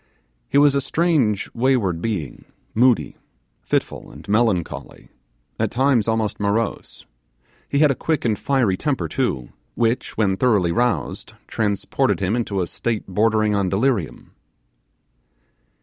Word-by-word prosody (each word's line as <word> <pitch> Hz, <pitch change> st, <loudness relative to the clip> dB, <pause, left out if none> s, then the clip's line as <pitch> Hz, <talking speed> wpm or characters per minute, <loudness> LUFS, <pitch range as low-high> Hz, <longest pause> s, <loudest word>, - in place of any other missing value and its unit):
He -, -, +2 dB
was 145 Hz, -1 st, +6 dB
a 140 Hz, -, +1 dB
strange 140 Hz, -, +1 dB
wayward 115 Hz, -9 st, +1 dB
being, 95 Hz, -, -4 dB, 0.3 s
moody, 125 Hz, +1 st, +2 dB, 0.4 s
fitful, -, -, -2 dB
and -, -, -13 dB
melancholy 105 Hz, -5 st, -1 dB, 0.5 s
at -, -, +1 dB
times 130 Hz, -3 st, +2 dB
almost 110 Hz, -2 st, -1 dB
morose. 105 Hz, +2 st, -2 dB, 0.6 s
He 140 Hz, -, 0 dB
had 150 Hz, -1 st, +5 dB
a 135 Hz, -, -5 dB
quick 160 Hz, -5 st, 0 dB
and 110 Hz, -3 st, +2 dB
fiery 120 Hz, -9 st, +1 dB
temper 145 Hz, +2 st, -1 dB
too, 65 Hz, -, -2 dB, 0.3 s
which, 115 Hz, +1 st, -1 dB
when 100 Hz, -3 st, +1 dB
thoroughly 105 Hz, -9 st, +2 dB
roused, 120 Hz, -4 st, -1 dB
transported 105 Hz, -3 st, 0 dB
him 95 Hz, +3 st, 0 dB
into 105 Hz, -5 st, -1 dB
a -, -, 0 dB
state 115 Hz, +5 st, -3 dB
bordering 110 Hz, +2 st, +1 dB
on 100 Hz, -2 st, +1 dB
delirium. 100 Hz, -, -1 dB
110 Hz, 130 wpm, -21 LUFS, 100-130 Hz, 0.6 s, was